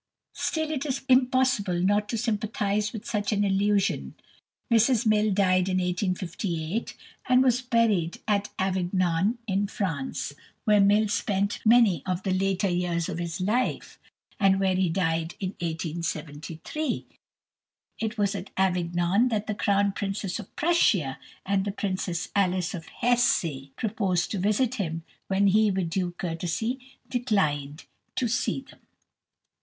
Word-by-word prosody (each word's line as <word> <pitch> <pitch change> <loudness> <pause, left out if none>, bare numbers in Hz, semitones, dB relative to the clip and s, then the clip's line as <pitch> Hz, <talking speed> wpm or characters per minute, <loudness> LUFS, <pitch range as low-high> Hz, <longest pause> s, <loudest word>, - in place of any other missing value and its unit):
Still, 315 -1 -1
it 285 -3 -2
is 275 -3 -3
impossible 255 -7 +3
not 205 +3 +2
to 230 - -1
sympathize 210 -2 -1
with 220 - -7
such 205 -3 -1
an 205 -1 +2
illusion. 195 - +1 0.6
Mrs 230 +1 +4
Mill 215 0 +3
died 185 -1 +3
in 185 - +1
1858, 180 0 -2 0.3
and 255 0 +6
was 250 -1 +3
buried 225 -9 +1
at 205 -1 +1
Avignon, 185 +2 +1
in 200 -1 0
France, 165 -9 -3 0.3
where 210 -1 +4
Mill 205 +2 +5
himself 215 -1 0
spent 200 -1 -1
many 220 - +5
of 185 0 -1
the 190 - 0
later 195 +1 +1
years 175 -2 -1
of - - -4
his 170 0 -4
life, 220 +7 -1 0.4
and 195 -1 +4
where 190 -1 +2
he 185 -1 +1
died 165 -1 -1
in 190 - -2
1873. 165 - -4 0.9
It 225 +1 -3
was 200 -2 +1
at 195 - -6
Avignon 180 +3 +2
that 215 -3 -1
the 215 - -2
Crown 200 -1 +2
Princess 195 0 -3
of 210 - -11
Prussia 215 - +2 0.3
and 195 0 +1
the 200 - -2
Princess 185 -4 -3
Alice 185 -2 +1
of 165 -3 -7
Hesse 210 - +1
proposed 200 -5 -1
to 200 - -2
visit 215 +6 +1
him, 165 -2 -3 0.2
when 195 +1 +2
he, 210 +2 +4
with 185 -4 -1
due 180 -1 -1
courtesy, 180 +9 -2 0.3
declined 155 - -1 0.3
to 250 - +1
see 245 +3 0
them. - - -18
195 Hz, 140 wpm, -27 LUFS, 175-215 Hz, 0.9 s, and